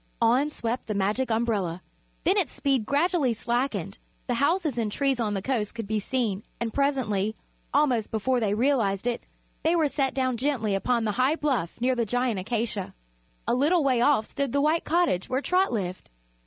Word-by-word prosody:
On 245 +6 +3
swept 240 -4 -3
the 215 - -2
Magic 210 +7 0
Umbrella. 210 -7 -1 0.4
Then 375 - +3
its 375 -10 +1
speed 265 -6 0
gradually 295 -3 +2
slackened; 240 +5 -2 0.3
the 245 - -1
houses 285 0 +1
and 215 -2 -1
trees 270 +1 0
on 210 -3 0
the 195 - -3
coast 235 -5 -1
could 225 -2 -4
be 215 +1 -1
seen, 215 -3 -1 0.2
and 230 -1 -3
presently 225 -7 0 0.4
almost 260 -7 +2
before 245 +4 0
they 210 -3 +1
realized 225 -5 +1
it 240 -1 -1 0.4
they 330 +2 +2
were 320 -3 +3
set 275 -2 -1
down 255 -2 0
gently 240 -5 0
upon 235 +4 +1
the 210 - +1
high 275 +5 +3
bluff 265 - -1
near 255 +2 +2
the 240 -2 0
giant 245 -2 0
acacia. 215 -1 -3 0.5
A - - +2
little 300 +7 +3
way 255 -4 +2
off 260 -4 +3
stood 275 0 -3
the 280 - +2
white 310 +3 +2
cottage 330 - +1
where 260 +1 +1
Trot 365 +6 +2
lived. 185 -5 -4
245 Hz, 185 wpm, -26 LUFS, 215-280 Hz, 0.5 s, On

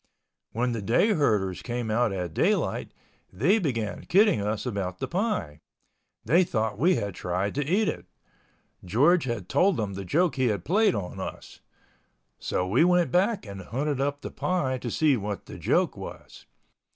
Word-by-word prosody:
When 125 +2 0
the 115 -2 -3
day 115 - +2
herders 105 - +1
came 120 -2 -3
out 120 0 +2
at 90 -4 -4
daylight, - - 0 0.4
they 160 - +2
began 115 - -3
kidding 200 - +4
us 105 +3 -2
about 100 -6 -3
the - - -4
pie. 170 - -2 0.7
They 165 +11 +4
thought 110 - -2
we 175 +7 +4
had 100 -4 -3
tried 90 +3 -2
to 145 - -1
eat 195 +9 +1
it. - - -4 0.8
George 140 - +3
had 115 -7 -4
told 185 - +2
them 105 -3 -2
the 100 +1 -5
joke 155 - +1
he 130 -1 +2
had 100 -5 -2
played 205 +3 +3
on 90 -3 -5
us. - - -7 0.8
So 90 - -1
we 115 - +3
went 180 -1 +3
back 195 - +1
and 100 -2 -8
hunted 135 +8 -2
up 145 +1 -1
the - - -6
pie 135 -8 -1
to 120 - -4
see 145 +2 +2
what 105 -1 -5
the - - -10
joke - - +1
was. - - -10
120 Hz, 175 wpm, -26 LUFS, 100-170 Hz, 0.8 s, kidding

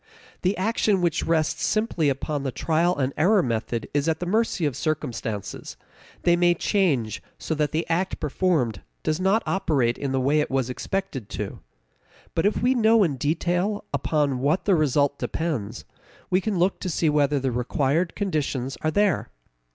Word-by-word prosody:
The 185 +3 +1
action 205 0 +1
which 175 -2 0
rests 160 -2 +1
simply 215 -9 +1
upon 140 +2 -2
the 135 -1 -2
trial 165 +5 +1
and 135 -1 0
error 185 +5 +4
method 115 -2 -2
is 145 +2 +1
at 160 - 0
the 180 - -3
mercy 205 -2 +1
of 145 -4 -1
circumstances; 120 - -4 0.5
they 175 - +5
may 175 0 +3
change 150 - 0 0.2
so - - -3
that 150 -2 0
the 160 +2 -1
act 175 +3 -1
performed 145 - 0 0.2
does 155 +2 0
not 195 +4 +2
operate 145 -11 +1
in 140 -2 -2
the 135 - +1
way 140 +4 +2
it 150 - 0
was 130 -2 0
expected 145 - -4
to. - - -4 0.7
But 165 +4 +2
if 210 - -1
we 255 +2 +4
know 225 -3 +4
in 155 -7 0
detail 175 +8 0
upon 145 -4 0
what 145 +7 +1
the 200 - +4
result 145 -3 +2
depends, 125 -10 -3 0.5
we 185 +1 +3
can 205 -1 -1
look 180 +3 +1
to 185 - -3
see 165 0 0
whether 145 -1 +2
the 130 -1 -1
required 140 +7 0
conditions 145 -9 -2
are 155 - +1
there. 200 +1 +1
155 Hz, 175 wpm, -25 LUFS, 135-185 Hz, 0.7 s, they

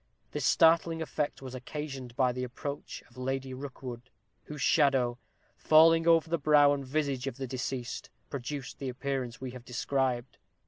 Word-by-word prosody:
This - - -1
startling 165 -1 +4
effect 150 -3 -3
was 130 -1 -7
occasioned 130 -1 -6
by 130 -1 +3
the 125 +1 -4
approach 140 +3 -6
of 120 - -22
Lady 130 +1 -3
Rookwood, 130 -2 -8 0.4
whose 150 -1 -8
shadow, 130 -5 +3 0.4
falling 165 +1 +5
over 165 -1 +5
the 170 0 0
brow 145 -1 +5
and 140 -1 -3
visage 135 -1 -1
of 135 - -4
the 135 - -3
deceased, 125 -2 -4 0.2
produced 140 0 -5
the 135 - -3
appearance 130 -2 -3
we 130 -1 -5
have 125 -1 -10
described. 125 0 -1
135 Hz, 155 wpm, -30 LUFS, 125-150 Hz, 0.4 s, falling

